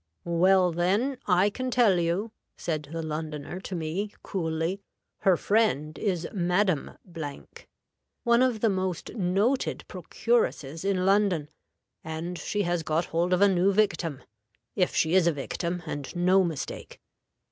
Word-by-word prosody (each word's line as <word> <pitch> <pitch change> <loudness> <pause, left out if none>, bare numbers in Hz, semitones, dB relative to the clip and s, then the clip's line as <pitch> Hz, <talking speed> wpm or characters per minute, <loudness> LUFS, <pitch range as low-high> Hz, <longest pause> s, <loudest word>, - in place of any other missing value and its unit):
'Well, 180 +2 +4
then, 200 +11 0
I 190 +2 +4
can 255 +4 -3
tell 230 -7 +4
you,' 175 +6 -1 0.3
said 155 -4 -3
the 165 0 -4
Londoner 155 +1 -5
to 190 0 -6
me, 175 +6 -3
coolly, 165 +1 -2 0.4
'her 190 -3 +4
friend 160 -9 +1
is 180 -5 -1
Madam, 180 -3 0 1.3
one 235 0 +4
of 250 -4 +2
the 225 - +4
most 185 -2 -3
noted 205 +6 0
procuresses 320 - -1
in 195 -2 +1
London, 195 -6 +2 0.5
and 165 +2 -5
she 205 +6 -1
has 175 -1 0
got 160 +2 0
hold 170 +2 +1
of 180 +1 +3
a - - +7
new 190 0 +3
victim, 185 -8 0 0.5
if 180 -2 +1
she 160 +1 +2
is 185 -2 +5
a - - +5
victim, 170 +5 -3
and 145 +1 -5
no 185 +2 +4
mistake.' 165 -6 -5
180 Hz, 140 wpm, -27 LUFS, 165-200 Hz, 1.3 s, a